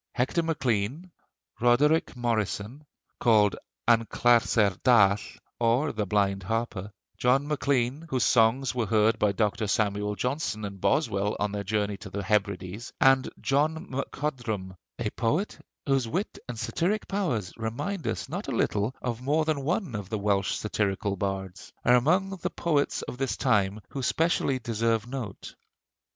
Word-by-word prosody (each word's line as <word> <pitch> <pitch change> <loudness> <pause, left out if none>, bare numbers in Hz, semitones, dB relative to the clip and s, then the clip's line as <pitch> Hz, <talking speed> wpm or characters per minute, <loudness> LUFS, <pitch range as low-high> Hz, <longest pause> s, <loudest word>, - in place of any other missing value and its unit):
Hector 130 +7 +1
Maclean; 145 - -1 0.5
Roderick 140 +8 +3
Morrison, 120 +3 -2 0.3
called 105 -4 +4 0.3
An 115 -1 +5
Clarsair 115 -5 +3
Dall, 105 -6 +6 0.4
or 120 +6 +2
the 105 -2 -2
Blind 100 -1 +1
Harper; 105 0 -3 0.3
John 135 +4 +3
Maclean, 140 0 0
whose 130 -2 +1
songs 125 +3 +3
were 120 -4 -1
heard 110 +2 +3
by 105 - +3
Dr. 105 +2 0
Samuel 105 0 0
Johnson 125 -4 -2
and 100 -2 -8
Boswell 105 -2 +1
on 105 -1 0
their 100 0 -3
journey 105 0 -1
to 100 - -10
the 100 +1 -4
Hebrides; 100 +1 -1
and 135 -1 +4
John 155 +6 0
MacCodrum 120 -8 -3 0.2
(a 115 -3 -2
poet 150 - -1 0.2
whose 135 -4 +1
wit 185 - -3
and 120 - -4
satiric 170 - -1
powers 140 - -1
remind 145 - -3
us - - -2
not - - -5
a - - -2
little 105 +5 0
of 120 -1 -3
more 150 +4 +1
than 155 -3 0
one 165 - -1
of 100 -3 -5
the 110 - -1
Welsh 100 -1 +1
satirical 100 -1 -1
bards), 95 -1 -4
are 125 - +6
among 180 +10 +2
the - - -2
poets 150 -4 0
of 125 - -7
this 135 -2 -1
time 105 -4 +2
who 135 - -5
specially 150 0 +1
deserve 115 -1 0
note. 120 -6 -6
115 Hz, 150 wpm, -27 LUFS, 105-135 Hz, 0.5 s, Dall